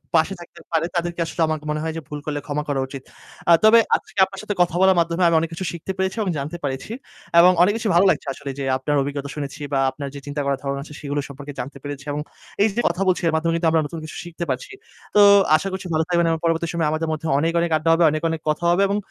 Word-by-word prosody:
পাশে 165 +5 +3
থাকতে 170 0 -13
পারে 165 0 +1
তাদেরকে 175 0 -2
আসলে 165 - -4
আমার 155 0 -1
মনে 150 - -2
হয় 160 -1 -2
যে - - -4
ভুল 150 0 -6
করলে 145 -1 -2
ক্ষমা 150 0 -2
করা 140 -1 0
উচিত। 135 -1 -8 0.5
আ - - +7
তবে 225 +2 +8 0.2
আজকে - - -6
আপনার 195 0 -10
সাথে 210 - -2
কথা 175 -1 +2
বলার 190 -1 +5
মাধ্যমে 170 +2 +1
আমি 165 - +3
অনেক 165 0 -2
কিছু 185 +3 -4
শিখতে 170 +3 -5
পেরেছি 190 +3 -1
এবং 195 - -1
জানতে 150 +5 -4
পেরেছি 135 +8 -4 0.5
এবং 180 +2 +8
অনেক 205 +3 +5
কিছু 225 -2 -2
ভালো 185 +3 +5
লাগছে 150 -4 0
আসলে 140 - -7
যে - - -2
আপনার 145 +2 -1
অভিজ্ঞতা 140 0 -4
শুনেছি 145 +1 -6
বা 135 - +2
আপনার 140 -2 -6
যে - - -6
চিন্তা 145 0 -3
করার 140 -1 0
ধারণা 140 0 -2
আছে 150 - -12
সেগুলো 145 0 -2
সম্পর্কে 140 +1 -9
জানতে 140 +2 -6
পেরেছি 145 0 -7
এবং 150 +1 -2 0.4
এই - - +5
যে 240 - +1
কথা 175 +3 -2
বলছি 185 - +2
এর 160 - +1
মাধ্যমে 165 +1 +1
কিন্তু 165 0 +1
আমরা 160 -1 +3
নতুন 160 +2 -6
কিছু 155 - -9
শিখতে 175 0 -6
পারছি। 130 - -3 0.4
তো 205 - +7 0.4
আশা 195 - -4
করছি 190 -1 -5
ভালো 160 +1 +2
থাকবেন 170 -1 +2
এবং 160 - -1
পরবর্তী 165 0 +1
সময়ে 165 -2 0
আমাদের 160 +1 -1
মধ্যে 155 +1 -3
অনেক, 165 +2 +1
অনেক 170 0 0
আড্ডা 160 +2 -1
হবে, 170 +1 +3
অনেক, 155 - -2
অনেক 160 -1 -3
কথা 150 +3 -1
হবে 180 +3 +2
এবং 200 +1 0
160 Hz, 260 wpm, -22 LUFS, 145-175 Hz, 0.5 s, তবে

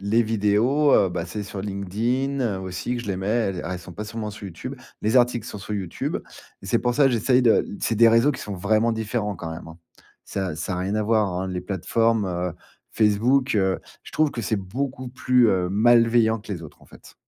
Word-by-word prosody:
les 110 +4 +2
vidéos, 115 +7 +2
heu 95 - +4
bah, 85 0 -3
c'est 105 +4 -5
sur 100 -1 -6
LinkedIn 110 +4 -1
aussi 95 +6 -4
que 120 - -4
je 115 - -10
les 95 - -1
mets. 95 - -4
Elles 105 -5 0
elles 90 +1 -3
sont 90 0 -11
pas 105 - -6
seulement 105 0 -5
sur 105 0 -10
YouTube. 95 +9 -7 0.3
Les 110 +4 +2
articles 120 -2 +1
sont 105 - -7
sur 100 +2 -5
YouTube 95 -4 -3 0.5
et - - -9
c'est 115 +4 +2
pour 120 -1 0
ça 140 0 +5
j'essaye 125 +1 +2
de 115 - +4
c'est 115 - 0
des 115 +1 +6
réseaux 115 +6 +4
qui - - -7
sont 100 - -5
vraiment 110 +5 +1
différents, 110 -2 -2
quand 80 0 -6
même, 80 - -9
hein. 80 +1 -12 0.5
Ça 95 -5 -3
ça 90 +3 -3
a - - -3
rien 95 +3 -2
à 110 - +1
voir, 110 -1 +2
hein, 90 +1 -3
les 90 -1 -3
plateformes. 105 +4 0
Heu, 90 -2 -2 0.4
Facebook, 115 +6 +2
heu, 95 -1 +1 0.3
je - - -12
trouve 155 -1 +2
que 120 - -5
c'est 110 0 -1
beaucoup 130 +7 -4
plus, 125 -1 +3
heu, 90 -2 +1
malveillant 115 +2 +4
que 105 - -12
les 85 -3 -6
autres, 80 - -12
en - - -19
fait. - - -16
105 Hz, 225 wpm, -24 LUFS, 95-120 Hz, 0.5 s, des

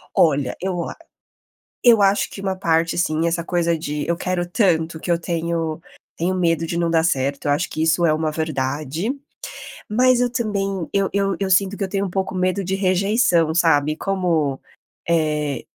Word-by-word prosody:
Olha, 140 -5 +2
eu 180 -2 -2
a - - -8 0.9
eu 230 -4 +6
acho 195 +1 +3
que 195 - -9
uma 190 -1 -1
parte 165 -3 0
sim, 160 -1 +1
essa 170 0 0
coisa 170 -1 0
de: 150 -1 -4
"Eu 170 - +1
quero 180 0 -2
tanto 170 -4 +1
que 175 - -5
eu 170 - +3
tenho 165 -2 -2 0.3
tenho 180 +3 -1
medo 165 -2 +1
de 170 - -3
não 170 -1 0
dar 165 -1 +3
certo". 140 -3 0
Eu - - +2
acho 150 +4 -1
que 155 - -3
isso 165 +2 +2
é 155 - +4
uma 155 0 0
verdade, 155 - -2 0.8
mas 250 +3 +3
eu 245 0 +1
também 195 - -2
eu 195 -1 +1
eu 195 -1 0
eu 195 - -1
sinto 195 +1 +3
que 205 - -5
eu 195 - -1
tenho 195 +1 -1
um - - -6
pouco 190 +1 -2
medo 185 +2 0
de 190 +1 -2
rejeição, 185 -3 +2
sabe. 155 -3 +3
Como, 170 -9 -1 0.5
eh, 150 -5 0
170 Hz, 185 wpm, -21 LUFS, 160-195 Hz, 0.9 s, eu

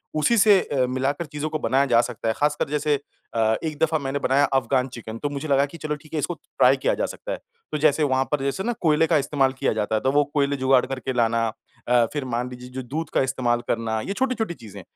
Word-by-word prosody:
उसी 190 +10 +3
से 205 -1 +6
अ, 130 -3 0
मिलाकर 135 +5 -1
चीज़ों 150 +1 -4
को 155 - -3
बनाया 135 0 +2
जा 120 -3 +4
सकता 120 -2 -5
है। 110 - +2
खासकर 150 -1 0
जैसे 150 -1 +1 0.4
अ, 110 -1 +3
एक 155 -2 -3
दफ़ा 160 0 +2
मैंने 140 +1 -2
बनाया 135 +1 +3
अफ़गान 130 0 +2
चिकन 115 -2 -8
तो 145 - -2
मुझे 145 +2 -5
लगा 140 -1 +3
कि 145 +4 -11
चलो 155 -2 -3
ठीक 150 +1 -17
है 155 - 0
इसको 175 - -1
ट्राई - - +2
किया - - +1
जा - - -1
सकता - - -7
है। - - -2 0.3
तो - - -1
जैसे 155 0 +3
वहाँ 130 -2 +2
पर 150 - +1
जैसे 140 +8 -1
ना 240 +3 0
कोयले 160 -1 +3
का 160 -2 +3
इस्तेमाल 135 -1 +1
किया 130 - 0
जाता 110 0 -1
है। 110 - 0
तो 135 - +2
वो 145 +1 +4
कोयले 140 -1 +1
जुगाड़ 130 -1 +3
करके 130 0 -4
लाना 115 -1 +2 0.4
अ, 120 -1 +5
फ़िर 145 -3 -3
मान 125 0 -2
लीजिए 125 0 -10
जो 130 +1 -5
दूध 155 +7 -4
का - - +3
इस्तेमाल 125 -2 0
करना 115 -1 -1
ये 195 - -3
छोटी-छोटी 240 -5 -1
चीज़ें। 110 - -11
140 Hz, 250 wpm, -24 LUFS, 125-150 Hz, 0.4 s, से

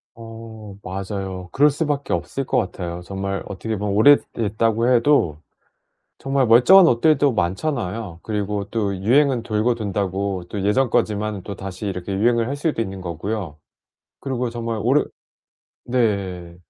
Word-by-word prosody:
어 115 -2 -10
맞아요. 95 -1 -5
그럴 145 +2 +5
수 155 +3 -2
밖에 145 -1 -2
없을 135 - -2
것 125 - 0
같아요. 90 -7 -3
정말 95 +1 -4
어떻게 110 +3 -4
보면 100 -1 -2
오래됐다고 115 -2 +3
해도 115 - +3 0.8
정말 135 -1 0
멀쩡한 130 +12 +7
옷들도 140 0 +3
많잖아요. 95 - -2
그리고 105 -1 -2
또 100 -4 -1
유행은 125 +5 +2
돌고 110 +2 0
돈다고 100 -3 -2
또 100 -2 -4
예전 125 +6 +2
거지만 105 -3 -1
또 100 - -6
다시 95 +2 -7
이렇게 95 0 -4
유행을 115 +3 +2
할 140 - -3
수도 145 -5 -1
있는 95 -3 -4
거고요. 85 -1 -4 0.6
그리고 125 -3 -2
정말 115 -1 -4
오래 135 +7 +3 0.8
네. 100 -8 -1
110 Hz, 300 characters per minute, -21 LUFS, 95-120 Hz, 0.8 s, 멀쩡한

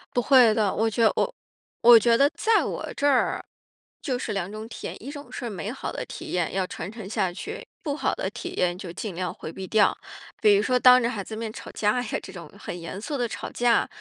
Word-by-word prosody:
不 245 - +3
会 250 -4 +6
的。 210 -3 +1
我 225 +1 +1
觉 230 +2 0
得 220 - +6
我 - - 0 0.5
我 235 0 +9
觉 230 +1 +4
得 280 +3 +5
在 445 0 +3
我 - - -4
这 285 - +1
儿 275 -3 +2 0.6
就 260 -5 -1
是 - - -4
两 195 -1 -3
种 215 +1 -7
体 220 - -6
验， - - -8
一 275 - -6
种 290 -1 -10
是 240 - -5
美 200 +2 -5
好 270 - -5
的 - - -5
体 - - -8
验， 175 -2 -1
要 190 0 0
传 200 - -6
承 220 -4 -8
下 190 -4 0
去， 435 - -7 0.2
不 290 -3 -2
好 280 - 0
的 190 - -2
体 240 - -7
验 180 0 +1
就 185 -3 -7
尽 195 +2 -5
量 180 0 -3
回 155 - -8
避 190 +2 -7
掉。 215 0 +4 0.5
比 210 -1 +6
如 200 - +3
说 250 +2 +2
当 250 0 +8
着 235 - +1
孩 215 -5 -4
子 220 - -7
的 - - -6
面 225 -1 -4
吵 - - -9
架 215 +4 +1
呀， 240 - -3
这 - - -10
种 170 -4 -10
很 175 - -7
严 170 +3 -6
肃 285 +5 -3
的 245 -2 0
吵 - - -6
架， 240 -1 +2
220 Hz, 275 characters per minute, -25 LUFS, 195-250 Hz, 0.6 s, 我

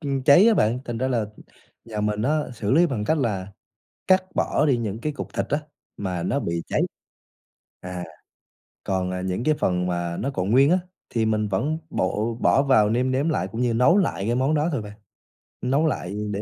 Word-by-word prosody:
ừm, 140 -4 -2
cháy 175 - +7
á 225 - +4
bạn, 115 - +2
thành 120 -1 -4
ra 130 - 0
là, 125 -3 +1
ừm, 105 -1 -3 0.5
nhà 110 -2 -5
mình 105 0 -1
á 150 +5 +2 0.2
xử 105 -2 -3
lý 165 +6 +5
bằng 110 -8 -3
cách 160 +4 +1
là 100 -6 -2 0.5
cắt 185 0 +5
bỏ 150 - +1
đi 135 - +3
những 110 -2 -3
cái 150 +4 -2
cục - - -7
thịt - - -1
á 145 - +1 0.4
mà 90 -4 -3
nó 140 - 0
bị 85 0 -2
cháy. - - 0 1.0
À, 90 -1 -6 0.8
còn, 95 -1 -1
à, 90 0 -3
những 95 +5 -2
cái 155 - +3
phần 90 -5 0
mà 85 -1 -2
nó 140 - -2
còn 95 -1 -1
nguyên 135 +6 +5
á 185 - +4 0.3
thì 115 -2 0
mình 110 -1 +1
vẫn 130 +11 -1
bộ 110 0 -1
bỏ 135 - +4
vào 120 -7 +4
nêm 125 +3 +1
nếm 140 +5 +1
lại 155 - 0
cũng 115 +2 -3
như 120 -2 +1
nấu 125 - +4
lại 165 - 0
cái 120 - +1
món 135 +4 +1
đó 150 +3 +1
thôi 135 -7 -1
bạn. 105 0 -9 0.7
Nấu 140 +5 +1
lại 100 - -3 0.2
để 100 - -3
115 Hz, 220 wpm, -24 LUFS, 100-140 Hz, 1.0 s, cháy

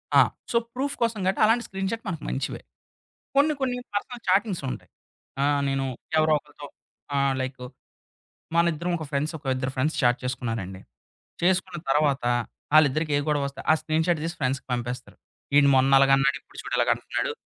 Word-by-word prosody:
ఆ! - - +9 0.3
So, 235 - +3 0.2
proof 280 +3 -2
కోసం 230 -3 +1
గాట్టి 190 - +1
అలాంటి 235 +2 +3
స్క్రీన్‌షాట్ 195 +4 -3
మనకు 165 -4 -4
మంచివే. 135 - -3 0.7
కొన్ని 295 +2 +4
కొన్ని 250 -2 0 0.2
పర్సనల్ 235 +3 -3
చాటింగ్స్ 190 -2 +2
ఉంటాయి. - - -9 0.5
ఆహ్, 145 0 +2
నేను 135 0 0 0.3
ఎవరో 155 0 +4
ఒకరితో 145 0 -13 0.5
ఆహ్, 140 -1 +2
లైకు 130 -1 -5 0.9
మనిద్దరం 170 +1 +1
ఒక 155 - -5
ఫ్రెండ్స్ 150 +3 -1
ఒక 145 - -27
ఇద్దరు 130 0 -2
ఫ్రెండ్స్ 145 +5 0
చాట్ 120 0 +4
చేసుకున్నారండి. 115 -7 -3 0.6
చేసుకున్న 180 -1 +1
తర్వాత 145 -2 +2 0.5
ఆళ్ళిద్దరికీ 155 0 +4
ఏ - - +1
గొడవొస్తే 140 -2 -1
ఆ - - +6
స్క్రీన్‌షాట్ 160 +1 +1
దీసి 170 +1 -3
ఫ్రెండ్స్‌కి 130 0 -1
పంపేస్తారు. 120 +1 -4 0.4
ఈడు 140 -1 +7
మొన్న 130 +1 +4
అలాగన్నాడు, 135 +1 +4
ఇప్పుడు - - -17
చూడు - - -4
ఇలాగంటన్నడు 475 - 0
150 Hz, 150 wpm, -25 LUFS, 135-185 Hz, 0.9 s, ఆ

